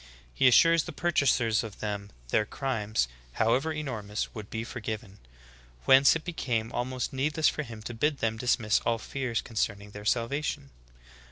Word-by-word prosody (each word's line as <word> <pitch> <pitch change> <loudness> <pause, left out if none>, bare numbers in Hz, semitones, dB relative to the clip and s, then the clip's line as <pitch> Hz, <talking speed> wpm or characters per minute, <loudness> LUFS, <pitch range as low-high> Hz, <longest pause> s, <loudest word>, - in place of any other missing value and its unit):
He 130 - +4
assured 165 +7 +6
the - - -2
purchasers 130 -9 +2
of 110 -2 -8
them, 100 -1 -4 0.2
their 105 - +3
crimes, 110 - -1 0.3
how 110 - +2
ever 150 +5 +1
enormous, 115 -9 -4
would 105 -3 -8
be 110 0 -3
forgiven; 110 -3 -6 0.7
whence 135 +2 +7
it 160 - -4
became 120 -10 -2
al 120 - 0
most 130 +2 -3
needless 150 +4 +2
for - - -3
him 115 -6 -9
to 120 - -5
bid 145 +5 +1
them 115 -2 0
dismiss 115 -2 +2
all 115 0 0
fears 125 -1 -3
con 115 - -11
cerning 105 -1 -1
their 105 0 -9
salvation. 140 +5 -1
120 Hz, 170 wpm, -28 LUFS, 110-140 Hz, 0.7 s, whence